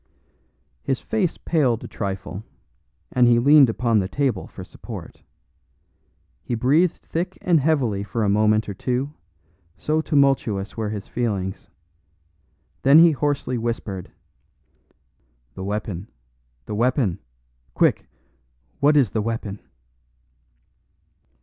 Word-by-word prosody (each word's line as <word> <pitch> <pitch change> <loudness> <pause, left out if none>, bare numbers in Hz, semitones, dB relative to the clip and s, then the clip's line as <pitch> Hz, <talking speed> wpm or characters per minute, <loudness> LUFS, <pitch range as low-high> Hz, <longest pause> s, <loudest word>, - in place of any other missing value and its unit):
His 135 - -1
face 200 -7 -1
paled 130 -9 +1
a - - -6
trifle, 95 0 -5 0.7
and 125 -1 +4
he 120 -1 +5
leaned 140 +1 +6
upon 115 -1 +1
the 95 - -1
table 135 +4 -1
for - - -10
support. - - -10 1.2
He 120 - -3
breathed 150 +9 +2
thick 175 +3 -3
and 170 -3 +3
heavily 135 -9 +1
for 110 +2 -2
a - - +1
moment 105 +2 +3
or 100 - -4
two, 130 +8 -2 0.6
so 155 +1 0
tumultuous 135 -10 +1
were 110 -2 -2
his 105 -2 -5
feelings; 100 -5 -3 1.1
then 140 +3 +6
he 165 +1 +8
hoarsely 140 -4 -1
whispered: 110 -5 -4 1.4
"The 95 - -7
weapon, 100 -1 -4 0.6
the - - -6
weapon! 120 - +1 0.6
Quick! - - +2 0.7
what 145 +1 +4
is 130 -8 +3
the 110 - 0
weapon?" 105 -2 -4
120 Hz, 115 wpm, -23 LUFS, 105-140 Hz, 1.4 s, he